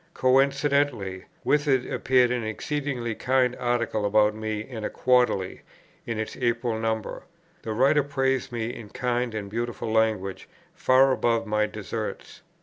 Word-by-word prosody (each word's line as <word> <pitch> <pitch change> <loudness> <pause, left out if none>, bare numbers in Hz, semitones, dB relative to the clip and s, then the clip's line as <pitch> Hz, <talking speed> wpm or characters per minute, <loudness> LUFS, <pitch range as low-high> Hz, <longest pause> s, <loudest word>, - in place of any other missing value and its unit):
Coincidently 135 -6 +1 0.2
with 150 0 +2
it 130 -3 +2
appeared 125 -2 +2
an 125 -2 -1
exceedingly 125 +1 -3
kind 125 +2 +1
article 120 -3 -1
about 105 +1 +3
me 110 0 -3
in 110 0 -7
a - - -1
Quarterly, 125 -7 +1 0.5
in 115 -2 -2
its 110 0 -4
April 120 -2 0
number. 110 -1 -2 0.4
The 110 - -4
writer 135 +6 +4
praised 135 -2 -1
me 120 0 -3
in 110 -4 -9
kind 120 -1 -2
and 105 -2 -4
beautiful 115 +1 -3
language 110 -4 0 0.2
far 130 +1 +4
above 115 -3 +1
my 105 0 +1
deserts. - - -6
120 Hz, 145 wpm, -26 LUFS, 110-130 Hz, 0.5 s, writer